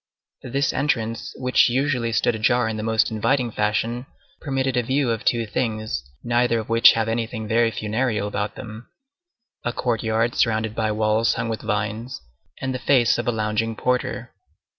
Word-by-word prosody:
This 140 Hz, +5 st, -1 dB
entrance, 115 Hz, -5 st, -1 dB
which 125 Hz, -1 st, +3 dB
usually 125 Hz, -2 st, 0 dB
stood 110 Hz, +2 st, +2 dB
ajar 115 Hz, +2 st, +2 dB
in 110 Hz, -, -2 dB
the 110 Hz, -, -4 dB
most 110 Hz, 0 st, +1 dB
inviting 120 Hz, +3 st, +1 dB
fashion, 115 Hz, +4 st, -1 dB, 0.3 s
permitted 135 Hz, -2 st, -1 dB
a 125 Hz, -, +3 dB
view 130 Hz, +1 st, 0 dB
of 115 Hz, -, -3 dB
two 115 Hz, -1 st, +1 dB
things, 110 Hz, -, -3 dB
neither 120 Hz, 0 st, +2 dB
of 110 Hz, -1 st, -5 dB
which 115 Hz, 0 st, +7 dB
have 115 Hz, -1 st, 0 dB
anything 115 Hz, -1 st, -3 dB
very 115 Hz, +1 st, +3 dB
funereal 110 Hz, 0 st, -1 dB
about 105 Hz, 0 st, -3 dB
them,—a 230 Hz, -, -10 dB
courtyard 115 Hz, -1 st, 0 dB
surrounded 110 Hz, -2 st, +1 dB
by 110 Hz, -1 st, 0 dB
walls 110 Hz, +1 st, +2 dB
hung 115 Hz, 0 st, -2 dB
with 110 Hz, -, -3 dB
vines, 110 Hz, +3 st, -3 dB, 0.4 s
and 130 Hz, 0 st, -2 dB
the 130 Hz, -, -3 dB
face 120 Hz, -2 st, +3 dB
of 120 Hz, -, -3 dB
a -, -, +3 dB
lounging 110 Hz, 0 st, -1 dB
porter. 125 Hz, +2 st, -1 dB
115 Hz, 160 wpm, -23 LUFS, 110-125 Hz, 0.4 s, which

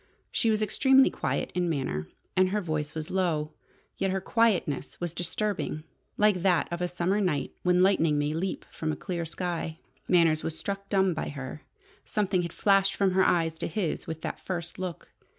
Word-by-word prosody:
She 230 Hz, -, +2 dB
was 215 Hz, -1 st, +2 dB
extremely 265 Hz, +5 st, +5 dB
quiet -, -, -2 dB
in 180 Hz, -1 st, 0 dB
manner, 130 Hz, -, -2 dB, 0.3 s
and 185 Hz, 0 st, +4 dB
her 210 Hz, +2 st, 0 dB
voice 155 Hz, -5 st, -2 dB
was 155 Hz, -1 st, -4 dB
low. 165 Hz, -5 st, 0 dB, 0.5 s
Yet 195 Hz, -, 0 dB
her 190 Hz, +1 st, 0 dB
quietness 190 Hz, -, +1 dB
was 175 Hz, -2 st, -3 dB
disturbing, 175 Hz, -2 st, -2 dB, 0.3 s
like 210 Hz, -4 st, +3 dB
that 180 Hz, -5 st, +3 dB
of 170 Hz, +1 st, -3 dB
a 180 Hz, -, +1 dB
summer 180 Hz, +4 st, 0 dB
night 160 Hz, -8 st, 0 dB
when 180 Hz, 0 st, +4 dB
lightning 165 Hz, -6 st, +3 dB
may 145 Hz, +1 st, 0 dB
leap 185 Hz, +4 st, -3 dB
from 160 Hz, -1 st, -2 dB
a -, -, -2 dB
clear 175 Hz, -3 st, -4 dB
sky. 165 Hz, -1 st, -3 dB, 0.3 s
Manners 165 Hz, -3 st, +4 dB
was 160 Hz, 0 st, -3 dB
struck 200 Hz, +4 st, -4 dB
dumb 190 Hz, -2 st, +3 dB
by 160 Hz, -, -3 dB
her. 135 Hz, 0 st, -7 dB, 0.4 s
Something 195 Hz, -3 st, 0 dB
had 170 Hz, -1 st, -4 dB
flashed 195 Hz, 0 st, +3 dB
from 195 Hz, -2 st, +2 dB
her 190 Hz, +1 st, +4 dB
eyes 165 Hz, -3 st, +2 dB
to -, -, -1 dB
his 195 Hz, -7 st, -2 dB
with 160 Hz, 0 st, -5 dB
that -, -, -4 dB
first 175 Hz, -1 st, -4 dB
look. 180 Hz, -4 st, -5 dB
180 Hz, 185 wpm, -28 LUFS, 160-195 Hz, 0.5 s, extremely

